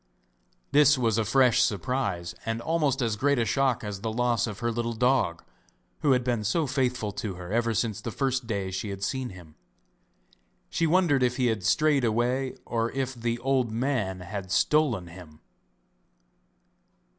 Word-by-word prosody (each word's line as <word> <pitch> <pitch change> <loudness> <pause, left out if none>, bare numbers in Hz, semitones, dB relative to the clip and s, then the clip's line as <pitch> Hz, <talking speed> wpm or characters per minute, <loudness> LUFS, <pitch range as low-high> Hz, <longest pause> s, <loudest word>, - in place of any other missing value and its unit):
This 145 -1 +6
was 115 -3 +1
a - - +2
fresh 125 +1 +4
surprise 95 -4 -1
and 115 0 -2
almost 145 -2 0
as 115 -2 0
great 140 +6 +1
a 115 - +1
shock 135 -2 +1
as 105 -2 -5
the 110 - -2
loss 120 -1 +1
of 105 -3 -6
her 120 0 -1
little 115 0 -2
dog, 125 -8 +1 0.6
who 140 -3 +3
had 125 -1 +1
been 120 -3 -1
so 155 +10 +1
faithful 125 -5 -1
to 100 -1 -5
her 90 +1 -8
ever 115 0 +1
since 110 -1 -1
the 115 - -4
first 130 0 -1
day 100 -4 -2
she 95 +3 -4
had 100 0 -6
seen 130 +2 -2
him. 85 -4 -13 1.2
She 165 - +1
wondered 165 -5 +3
if 125 0 +1
he 130 - +1
had 105 -4 -7
strayed 145 +7 +3
away 120 +3 0
or 115 0 -1
if 130 -1 -2
the 120 -1 -2
old 130 -3 +1
man 110 -6 -1
had 95 +1 -6
stolen 140 - +2
him. 85 -3 -13
120 Hz, 170 wpm, -27 LUFS, 105-130 Hz, 1.2 s, This